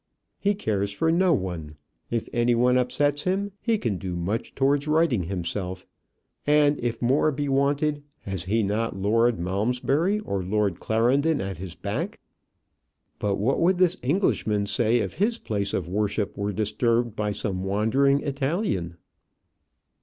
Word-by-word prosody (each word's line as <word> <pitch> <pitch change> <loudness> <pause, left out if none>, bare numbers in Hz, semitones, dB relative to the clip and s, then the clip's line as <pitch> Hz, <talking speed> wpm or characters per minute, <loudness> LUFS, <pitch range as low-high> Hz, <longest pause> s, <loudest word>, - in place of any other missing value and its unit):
He 205 0 +1
cares 100 - -1
for 160 +11 +1
no 180 +2 +3
one. 90 - -2 0.3
If 115 -1 -2
any 120 0 +2
one 125 +2 +3
upsets 145 +3 +1
him, 195 +4 -1
he 230 -2 +1
can 110 - -2
do 90 -2 -4
much 95 +6 -3
towards 140 +2 +2
righting 150 - +2
himself; 90 +1 -4 0.6
and 145 0 +4
if 120 -1 -1
more 135 +5 +3
be 145 +1 -2
wanted, 145 +2 +1 0.2
has 95 -3 -4
he 110 +4 +1
not 105 +1 -1
Lord 115 +4 +2
Malmesbury 125 - 0
or 100 - -2
Lord 100 -1 0
Clarendon 135 +8 +2
at 95 -3 -4
his 90 -2 -7
back? - - -3 1.0
But 100 -1 0
what 115 +8 0
would 180 +2 +3
this 180 0 +3
Englishman 125 - +1
say 110 +3 +2
if 115 - -2
his 225 +4 0
place 100 - -2
of 90 - -2
worship 105 +2 -1
were 100 +1 -2
disturbed 115 +2 0
by 105 -1 -1
some 95 -2 -2
wandering 115 +8 +2
Italian? 135 - -2
115 Hz, 150 wpm, -25 LUFS, 100-145 Hz, 1.0 s, and